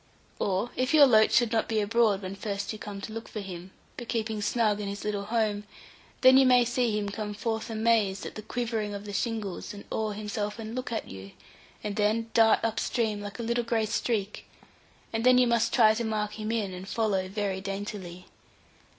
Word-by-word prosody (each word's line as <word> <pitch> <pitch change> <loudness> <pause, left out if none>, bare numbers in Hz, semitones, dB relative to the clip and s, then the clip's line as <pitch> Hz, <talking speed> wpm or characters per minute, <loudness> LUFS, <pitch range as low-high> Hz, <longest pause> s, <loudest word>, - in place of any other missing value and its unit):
Or 195 +5 0
if 255 +4 +1
your 295 -2 +9
loach 220 -4 +5
should 235 -1 +3
not 225 -2 +1
be 220 -1 +1
abroad 210 -2 +2
when 190 +1 -5
first 200 +1 -4
you 215 - -8
come 205 -2 -7
to 215 - -7
look 225 +1 -6
for 215 - -6
him, 185 -2 -7 0.3
but 240 - -7
keeping 220 -2 -2
snug 210 0 +1
in 205 - -4
his 200 0 -5
little 205 -1 -2
home, 215 -2 0 0.6
then 260 0 +8
you 270 - +6
may 250 -1 +6
see 240 -2 0
him 205 -1 -2
come 210 0 -5
forth 225 +2 -3
amazed 220 -3 +1
at - - -6
the 215 - -7
quivering 220 -2 -3
of 200 +1 -7
the 205 - -7
shingles, 210 -3 -3
and 205 - -10
oar 215 -2 -1
himself 210 0 -3
and 225 0 -6
look 255 0 -4
at 225 - -3
you, 95 +1 -10 0.5
and 210 0 -4
then 220 +2 +1
dart 225 -1 +5
up 220 -1 -1
stream, 220 -4 -1
like 205 -1 -7
a 235 - -4
little 235 +1 0
grey 230 -1 0
streak; 215 -1 -2 0.7
and 225 0 -1
then 255 0 +6
you 250 - +5
must 235 -1 +2
try 220 -3 +6
to 230 +2 -2
mark 210 -1 -2
him 215 +1 -2
in, 210 -5 -1
and 180 +1 -8
follow 200 -5 0
very 195 -1 -2
daintily. 195 -2 -6
215 Hz, 210 wpm, -28 LUFS, 205-230 Hz, 0.7 s, your